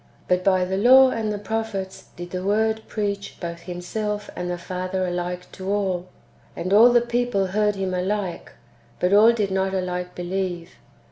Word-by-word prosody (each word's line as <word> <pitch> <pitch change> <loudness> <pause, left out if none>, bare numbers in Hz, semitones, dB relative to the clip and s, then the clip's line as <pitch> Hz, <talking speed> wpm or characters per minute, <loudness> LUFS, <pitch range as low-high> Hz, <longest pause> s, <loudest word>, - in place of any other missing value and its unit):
But 180 0 +2
by 185 -1 +3
the 190 +1 -2
law 260 +5 +7
and 220 -3 -2
the 210 - -2
prophets 205 -2 -4
did 175 0 -8
the 185 0 -4
Word 220 +2 +1
preach 200 -2 -3
both 170 -1 -5
Himself 205 +4 -4
and 180 0 -4
the 175 - -2
Father 185 +1 -3
alike 180 0 -4
[to 190 0 -7
all]; 190 -3 -1 0.5
and 185 +3 -2
all 230 +4 +8
the 240 0 +5
people 240 -4 0
heard 210 +2 +1
Him 190 -1 -2
alike, 185 0 -2 0.5
but 180 +2 +2
all 215 +3 +7
did 210 -4 -1
not 190 0 0
alike 180 -1 -3
believe. 175 -1 -3
190 Hz, 175 wpm, -23 LUFS, 180-210 Hz, 0.5 s, all